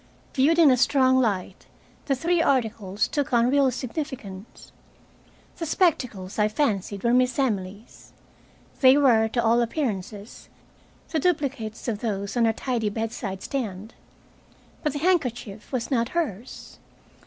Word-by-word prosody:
Viewed 290 +5 +3
in 320 -5 +7
a 255 - +3
strong 260 +1 +3
light, 195 -6 -2 0.4
the 275 - +2
three 335 +5 +1
articles 220 - 0
took 290 -3 -2
on 240 +1 +3
real 280 -1 +4
significance. 245 - -7 0.9
The 330 - -4
spectacles 250 - 0
I 210 - +4
fancied 210 -5 -1
were 235 0 +2
Miss 250 0 +2
Emily's. 210 -5 -3 0.7
They 260 +1 +7
were, 235 -6 +4
to 235 +1 -1
all 235 +1 +3
appearances, 220 - -4 0.6
the 320 - 0
duplicates 275 -10 -2
of 220 -3 -2
those 200 -2 -3
on 235 -1 +3
her 225 - +3
tidy 230 -3 -2
bedside 210 -3 -4
stand. 220 -5 -4 0.9
But 300 -3 -1
the - - -3
handkerchief 250 - -1
was 255 -2 -3
not 235 -2 +1
hers. 250 - -4
240 Hz, 135 wpm, -25 LUFS, 210-275 Hz, 0.9 s, in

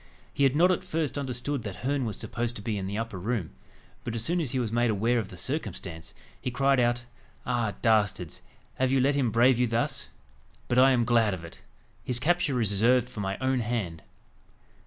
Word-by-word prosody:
He 140 - -4
had 135 +1 +3
not 175 +4 +5
at 180 - 0
first 155 -3 -2
understood 135 0 -2
that 100 -4 -6
Herne 140 -1 0
was 110 - -3
supposed 115 +2 -3
to 105 - -8
be 110 -1 -2
in 95 -2 -3
the 100 +2 -3
upper 115 -4 -4
room; 105 -3 -2 0.5
but 115 - -4
as 115 - -1
soon 175 +7 0
as 150 - -2
he 130 - -1
was 120 -4 -1
made 120 +1 +2
aware 115 +3 +2
of 105 - -4
the 90 - -10
circumstance, 90 - -5 0.3
he - - -2
cried 135 +1 +2
out 120 0 +1 0.4
"Ah, 120 -4 -1
dastards! 105 -7 +1 0.4
have 130 0 +2
you 135 - +3
let 135 +3 +3
him 135 -4 +1
brave 120 +3 +4
you 125 - +3
thus? 115 +1 -1 0.6
But 120 - +2
I 130 +1 +7
am 120 -3 +3
glad 115 -4 +3
of 85 -2 -9
it. 85 - -12 0.4
His 125 -1 0
capture 150 -3 +1
is 110 -3 +1
reserved 120 +5 +3
for 115 - -8
my 95 -1 -2
own 130 0 +1
hand." 105 -9 -2
120 Hz, 215 wpm, -28 LUFS, 105-130 Hz, 0.6 s, I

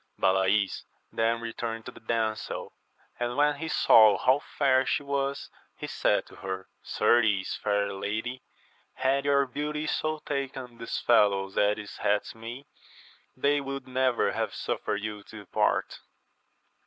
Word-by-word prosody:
161 - - -27
Balays 95 +1 +2 0.3
then 115 +1 0
returned 115 -1 -5
to - - -7
the - - -14
damsel, 110 -1 -2 0.5
and 120 +1 -2
when 145 0 +3
he 160 - -4
saw 110 -9 +6
how 130 +2 +3
fair 135 -3 +2
she 140 - -1
was, 140 0 -2 0.3
he - - -5
said - - +1
to - - -16
her, 95 -1 -5
Certes, 105 -4 +2
fair 100 -1 0
lady, 110 +6 -3 0.5
had 135 +2 +1
your 140 -1 +4
beauty 150 +3 -3
so 155 0 -1
taken 135 -4 -4
these 115 - -4
fellows 100 -4 +3
as 105 +1 +3
it 105 -1 -8
hath 105 0 0
me, 115 +5 -8 0.7
they 145 +2 +2
would 135 -1 -6
never 130 -1 +1
have - - -2
suffered 105 0 -2
you 105 -1 -4
to 110 - -12
depart. - - 0
115 Hz, 145 wpm, -28 LUFS, 105-135 Hz, 0.7 s, saw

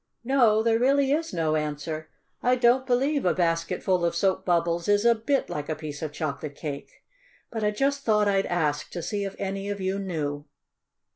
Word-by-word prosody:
No, 235 -4 +4
there 225 0 +3
really 275 +2 +3
is 325 +2 0
no 160 -2 0
answer. 155 +1 -3 0.3
I 250 +1 +3
don't 255 +1 +3
believe 275 +3 +1
a 180 - +2
basket 165 -2 0
full 185 -2 +1
of 170 0 +1
soap 190 +2 +1
bubbles 170 -1 +1
is 205 +2 +3
a 235 - +7
bit 250 +5 0
like 145 +1 -5
a 155 - -1
piece 150 -2 -7
of 155 -2 -3
chocolate 150 -1 -4
cake. 145 -2 -7 0.5
But 225 -2 -3
I 210 - +3
just 275 +6 0
thought 210 -3 +3
I'd 195 -1 +2
ask 150 -4 -1
to 175 - -4
see 205 +3 -2
if 195 - -5
any 195 0 -3
of 205 0 -3
you 190 +1 -1
knew." 150 -6 -3
195 Hz, 200 wpm, -26 LUFS, 160-235 Hz, 0.5 s, a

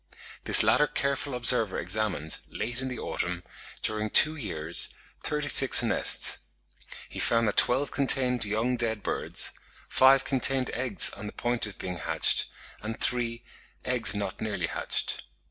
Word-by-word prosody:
This - - +9
latter 150 - +2
careful 140 -1 -3
observer 115 -4 +2
examined, 90 -4 -2
late 120 +3 -5
in 130 - -5
the 125 -1 -7
autumn, 90 -4 -5 0.4
during 110 0 -2
two 155 +8 +6
years, 85 - -1 0.3
thirty 150 -1 -3
six 135 -3 +7
nests; 115 - +1 0.7
he - - -10
found 115 -1 0
that 105 - -3
twelve 135 +4 +2
contained 130 -3 +1
young 110 +4 -2
dead 110 -3 -3
birds, - - -1 0.4
five 135 +1 +3
contained 135 -1 0
eggs 120 -4 +2
on 105 +1 -10
the - - -8
point 120 -2 -2
of 100 - -12
being 90 -1 -7
hatched, 85 - -1 0.3
and 110 +1 -7
three, 120 -1 -3 0.4
eggs 125 -4 0
not 100 -2 -6
nearly 110 -2 -4
hatched. - - -4
120 Hz, 145 wpm, -26 LUFS, 105-130 Hz, 0.7 s, This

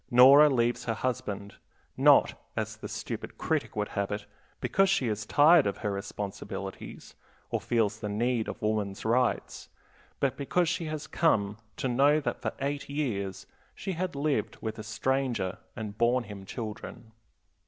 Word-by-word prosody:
Nora 135 +5 +8
leaves 120 -3 +1
her 115 - -1
husband, 105 -5 -3 0.4
not - - +6 0.2
as - - -2
the - - -7
stupid - - -6
critic - - -1
would 105 -1 -1
have 100 -1 -2
it 105 0 -3 0.3
because 195 0 +2
she 190 -10 +2
is 105 -1 -2
tired 155 -1 +6
of 100 - -2
her 105 - +1
responsibilities 100 0 -6 0.4
or - - 0
feels 110 -2 +1
the 105 -2 -4
need 115 +2 0
of - - -5
woman's 105 -2 -1
rights, 125 +2 0 0.5
but 135 -2 0
because 170 +5 +1
she 175 0 -1
has 155 -1 -4
come 105 -11 +1 0.2
to - - -1
know 140 +5 +4
that 145 - -3
for - - -1
eight 140 +1 -2
years 110 -10 -2 0.3
she 195 - -4
had 180 -2 -3
lived 140 -6 -1
with 110 0 -5
a - - -5
stranger 120 -3 -1 0.2
and 105 -2 -6
borne 120 +1 +3
him 100 -3 -9
children. 110 0 -7
120 Hz, 160 wpm, -29 LUFS, 105-140 Hz, 0.5 s, Nora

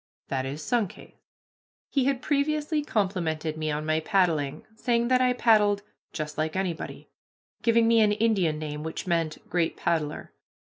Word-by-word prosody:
That 135 -1 -1
is 145 +3 -5
Sunkhaze." 225 -3 -2 0.8
He 270 -3 +2
had 270 -2 0
previously 300 +1 +1
complimented 175 - -1
me 155 0 -2
on 150 0 -2
my 155 0 +2
paddling, 160 -6 +1
saying 235 +1 +1
that 255 0 +4
I 250 -1 +3
paddled 210 -4 +3 0.3
"just 155 -1 -5
like 155 0 -1
anybody," 185 -3 -4 0.5
giving 230 -1 +4
me 230 -1 +5
an 210 -1 +4
Indian 205 -8 +1
name 150 -1 -5
which 160 +1 -5
meant 165 -3 -1
"great 170 -2 0
paddler." 155 -3 -2
180 Hz, 150 wpm, -27 LUFS, 155-230 Hz, 0.8 s, me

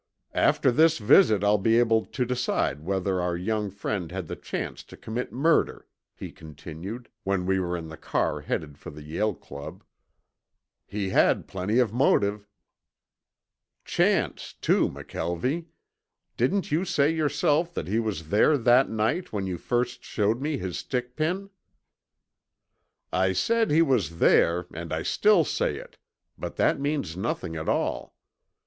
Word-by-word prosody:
"After 130 - +3
this 160 +5 +4
visit 110 - +5
I'll 105 0 +4
be 115 +3 +3
able 115 -2 +3
to 125 - -2
decide 120 - -1
whether 95 +1 -1
our 90 -1 -1
young 105 +3 -1
friend 100 -3 -4
had 95 -1 -4
the - - -6
chance - - -5
to - - -13
commit 115 +3 -4
murder," 155 +7 +1 0.3
he - - -8
continued 80 - -9 0.2
when 95 -2 0
we 95 +1 +1
were 90 -1 -2
in 80 -1 -7
the 80 - -9
car 75 -2 -1
headed 75 -1 -4
for - - -9
the 75 0 -11
Yale 90 +7 -1
Club. 70 +1 -10 1.0
"He 100 -2 -3
had - - +3
plenty 95 +4 -1
of 120 -4 +2
motive." 105 -5 +2 1.4
"Chance, - - 0
too, - - +2
McKelvie. 125 - -3 0.7
Didn't 195 -6 0
you 160 +4 +2
say 150 -5 +2
yourself 155 +1 +1
that 80 - -3
he 110 +5 +1
was 95 -9 -3
there 110 +9 +4
that 125 +1 +4
night 110 +12 -1
when 100 -3 -2
you 90 -2 -4
first 120 0 -1
showed 110 +3 0
me 150 0 -1
his 95 -7 -4
stick 125 -1 -4
pin?" 185 +6 -2 1.6
"I 95 0 +2
said 230 - +1
he 160 +3 +5
was 105 - 0
there 85 +1 +4
and 85 0 -7
I 80 0 -2
still 205 -5 +4
say - - -1
it, - - -12 0.4
but - - -5
that - - +2
means 140 - -2
nothing 90 -4 -3
at 80 0 -3
all. - - -1
105 Hz, 155 wpm, -26 LUFS, 90-135 Hz, 1.6 s, visit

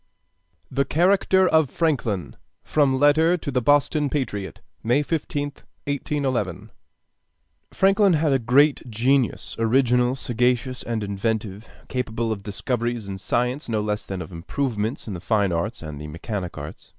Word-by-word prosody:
] 85 -3 -44
THE 140 - +4
CHARACTER 190 +5 +3
OF 160 -5 +3
FRANKLIN 110 - -1 0.3
From 140 -3 +2
Letter 155 +5 +4
to 145 - -5
the 125 -1 +1
Boston 145 +2 +3
Patriot, 105 -10 -3 0.2
May 125 +6 +2
15th, 145 -2 -3 0.2
1811 135 - -2 1.0
Franklin 195 0 +4
had 155 -2 +2
a 135 - +3
great 130 +3 +3
genius, 125 +3 +1
original, 125 +1 +3
sagacious, 125 0 0
and 115 -2 -3
inventive, 105 +1 -3 0.2
capable 115 -2 -2
of 105 -2 -3
discoveries 120 +2 -3
in 95 -1 -5
science 125 +7 -1
no 110 -2 0
less 105 0 -2
than 95 -2 -5
of 80 - -12
improvements 110 +7 -3
in 105 - -4
the 90 - -5
fine 100 +1 +1
arts 85 +5 -2
and 75 -2 -7
the 75 - -6
mechanic 90 +3 -5
arts. 75 +1 -9
120 Hz, 145 wpm, -23 LUFS, 105-145 Hz, 1.0 s, THE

